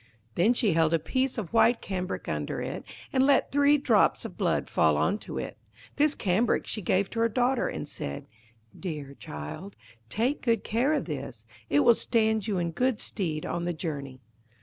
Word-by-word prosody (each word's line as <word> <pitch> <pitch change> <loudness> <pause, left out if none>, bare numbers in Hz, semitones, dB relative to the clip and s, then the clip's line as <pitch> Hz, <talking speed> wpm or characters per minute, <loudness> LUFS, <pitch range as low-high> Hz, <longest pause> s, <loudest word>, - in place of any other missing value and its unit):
Then 215 - +3
she 220 -7 +2
held 165 0 +3
a - - +4
piece 260 - -1
of 210 -5 -5
white 235 +1 +5
cambric 185 -1 -4
under - - -3
it, - - -4 0.3
and 260 -1 +4
let 280 +1 +3
three 285 +1 +5
drops 285 - +3
of - - -7
blood - - 0
fall - - +3
on - - +1
to - - -7
it. - - -5 0.4
This 295 +1 +3
cambric 200 +5 +1
she 215 - -4
gave 190 +2 +1
to 230 - -3
her 230 0 +3
daughter, 250 +3 +1
and - - -5
said, 70 0 -6 0.5
'Dear 150 -6 -6
child, 140 - -8 0.3
take 245 - 0
good 230 -4 +1
care 250 +7 +1
of 290 - 0
this; 135 -7 -6 0.2
it 145 - +4
will 235 - +7
stand 220 -2 +1
you 205 -3 0
in 170 -1 -1
good 250 +5 0
stead 160 -7 -3
on 170 0 -2
the 175 - -1
journey.' 140 -5 -5
200 Hz, 190 wpm, -28 LUFS, 160-245 Hz, 0.5 s, will